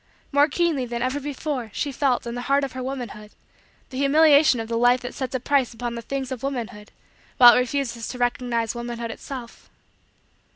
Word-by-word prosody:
More 285 Hz, +1 st, +4 dB
keenly 320 Hz, -3 st, 0 dB
than 235 Hz, 0 st, -3 dB
ever 260 Hz, +3 st, -1 dB
before, 280 Hz, -3 st, -4 dB
she 290 Hz, -, -2 dB
felt, 260 Hz, -2 st, 0 dB
in 235 Hz, -, -4 dB
the 245 Hz, -, -4 dB
heart 280 Hz, +1 st, +3 dB
of 275 Hz, -, -3 dB
her 255 Hz, -, -6 dB
womanhood, 245 Hz, -5 st, -6 dB, 0.6 s
the 260 Hz, -, -5 dB
humiliation 290 Hz, -1 st, +5 dB
of 225 Hz, -, -4 dB
the 230 Hz, -, -3 dB
life 245 Hz, +2 st, +4 dB
that 245 Hz, 0 st, -6 dB
sets 260 Hz, -2 st, -4 dB
a -, -, 0 dB
price 260 Hz, -2 st, +1 dB
upon 240 Hz, 0 st, -4 dB
the 235 Hz, -, -5 dB
things 270 Hz, +2 st, -4 dB
of 255 Hz, -3 st, -5 dB
womanhood 235 Hz, -6 st, -5 dB, 0.5 s
while 240 Hz, -1 st, +10 dB
it -, -, +4 dB
refuses 250 Hz, -2 st, -2 dB
to 250 Hz, -, -6 dB
recognize 245 Hz, -2 st, -1 dB
womanhood 235 Hz, -1 st, -5 dB
itself. 250 Hz, -1 st, -9 dB
250 Hz, 195 wpm, -24 LUFS, 235-275 Hz, 0.6 s, while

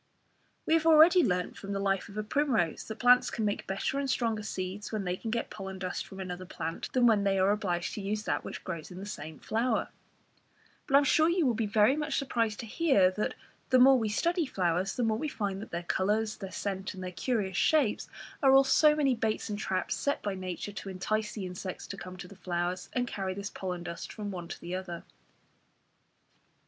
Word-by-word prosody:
We -, -, +2 dB
have 325 Hz, 0 st, +3 dB
already 325 Hz, +3 st, +7 dB
learnt 180 Hz, -5 st, -1 dB
from 200 Hz, 0 st, -5 dB
the 195 Hz, -, -1 dB
life 195 Hz, -1 st, 0 dB
of 205 Hz, -, -10 dB
a 215 Hz, -, -1 dB
primrose 235 Hz, -, 0 dB
that 220 Hz, -, -6 dB
plants 245 Hz, +1 st, +5 dB
can 220 Hz, -, -2 dB
make 205 Hz, -, -2 dB
better 195 Hz, +8 st, -1 dB
and 275 Hz, -1 st, -2 dB
stronger 230 Hz, -4 st, 0 dB
seeds 195 Hz, 0 st, -5 dB
when 215 Hz, -2 st, -2 dB
they 180 Hz, -1 st, -1 dB
can 225 Hz, -, -6 dB
get 230 Hz, +1 st, -2 dB
pollen 190 Hz, -2 st, -6 dB
dust 185 Hz, -1 st, -4 dB
from 195 Hz, -, -10 dB
another 185 Hz, -1 st, -5 dB
plant, 165 Hz, -2 st, -5 dB
than 250 Hz, -2 st, +4 dB
when 215 Hz, -4 st, +4 dB
they 195 Hz, -1 st, +2 dB
are 190 Hz, +1 st, +4 dB
obliged 180 Hz, -4 st, -1 dB
to 210 Hz, -, -4 dB
use 210 Hz, +2 st, -2 dB
that -, -, -1 dB
which -, -, -7 dB
grows 170 Hz, -4 st, -5 dB
in 180 Hz, -, -10 dB
the 195 Hz, -, -6 dB
same 155 Hz, -6 st, -7 dB
flower; 235 Hz, +3 st, 0 dB, 1.0 s
but 275 Hz, -, +2 dB
I -, -, +11 dB
am 285 Hz, -, +5 dB
sure 315 Hz, +3 st, +4 dB
you 345 Hz, -2 st, +2 dB
will 250 Hz, -, +3 dB
be 220 Hz, -1 st, -1 dB
very 210 Hz, +5 st, +4 dB
much 300 Hz, -1 st, -1 dB
surprised 230 Hz, -6 st, 0 dB
to -, -, -7 dB
hear 220 Hz, -, +3 dB
that 210 Hz, +3 st, -2 dB, 0.3 s
the 255 Hz, -, +5 dB
more 260 Hz, +1 st, +7 dB
we 220 Hz, -2 st, -1 dB
study 335 Hz, -, +1 dB
flowers 185 Hz, -2 st, 0 dB
the 245 Hz, -, 0 dB
more 220 Hz, -1 st, +1 dB
we 305 Hz, -, -2 dB
find 200 Hz, -7 st, -3 dB
that -, -, -8 dB
their 170 Hz, 0 st, -4 dB
colours, 210 Hz, +5 st, 0 dB
their 195 Hz, -2 st, -6 dB
scent, 195 Hz, 0 st, -4 dB
and 185 Hz, -, -7 dB
their 180 Hz, -, -4 dB
curious 195 Hz, -1 st, -1 dB
shapes 285 Hz, -, +2 dB, 0.3 s
are 270 Hz, -2 st, +6 dB
all 270 Hz, -, +8 dB
so 300 Hz, +2 st, +5 dB
many 280 Hz, -3 st, +3 dB
baits 220 Hz, -2 st, -1 dB
and 205 Hz, -, -3 dB
traps 185 Hz, -3 st, -1 dB
set 285 Hz, -, -1 dB
by 205 Hz, -, -1 dB
nature 185 Hz, +1 st, -5 dB
to 200 Hz, 0 st, -7 dB
entice 210 Hz, +4 st, -2 dB
insects 185 Hz, -1 st, -5 dB
to -, -, -6 dB
come 185 Hz, -1 st, -9 dB
to 180 Hz, -, -8 dB
the 200 Hz, -, -13 dB
flowers, 180 Hz, 0 st, -2 dB
and 250 Hz, -1 st, +1 dB
carry 190 Hz, -4 st, -3 dB
this 200 Hz, +1 st, -5 dB
pollen 180 Hz, -2 st, -4 dB
dust 170 Hz, -1 st, -6 dB
from 210 Hz, -2 st, -5 dB
one 175 Hz, -3 st, -6 dB
to -, -, -7 dB
the 175 Hz, +1 st, -6 dB
other. 185 Hz, -2 st, -5 dB
205 Hz, 225 wpm, -30 LUFS, 185-245 Hz, 1.0 s, I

